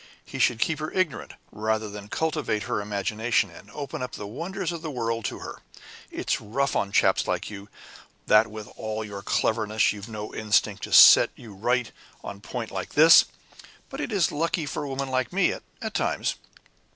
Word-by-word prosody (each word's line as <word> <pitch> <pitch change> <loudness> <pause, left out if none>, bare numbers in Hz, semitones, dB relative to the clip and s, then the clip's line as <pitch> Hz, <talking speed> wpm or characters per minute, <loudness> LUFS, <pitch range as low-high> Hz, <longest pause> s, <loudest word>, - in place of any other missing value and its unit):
He - - -8
should 120 - +3
keep 160 +5 0
her 155 0 -4
ignorant, 185 -7 -1 0.2
rather 110 +1 -1
than 105 0 -9
cultivate 130 -3 -1
her 105 - -2
imagination, 105 +1 -1
and 90 +5 -14
open 140 +3 -6
up 125 - -5
the 105 - -6
wonders 175 - -4
of 170 -2 -6
the 160 - -5
world 115 -4 -2
to - - -3
her. - - -8 0.5
It's - - -2
rough 135 +6 -1
on 100 - 0
chaps - - +3
like - - -2
you, 100 0 -9 0.6
that 105 +1 +5
with 110 -1 -9
all 110 0 -4
your 100 -2 -7
cleverness 110 +1 +1
you've 105 +1 -9
no 105 -1 -7
instinct 105 -2 +1
to - - -11
set - - +9
you 110 -4 -12
right 120 +4 0 0.3
on 100 - -7
a - - -18
point 115 +2 -6
like 95 -1 -5
this 160 +3 +8 0.7
but 275 +2 -5
it - - -4
is 195 -6 +2
lucky 165 +1 -1
for 145 +1 -4
women 135 0 -3
like 130 0 0
me 195 +2 +2 0.3
at - - -4
times! - - 0
115 Hz, 190 wpm, -25 LUFS, 105-145 Hz, 0.7 s, set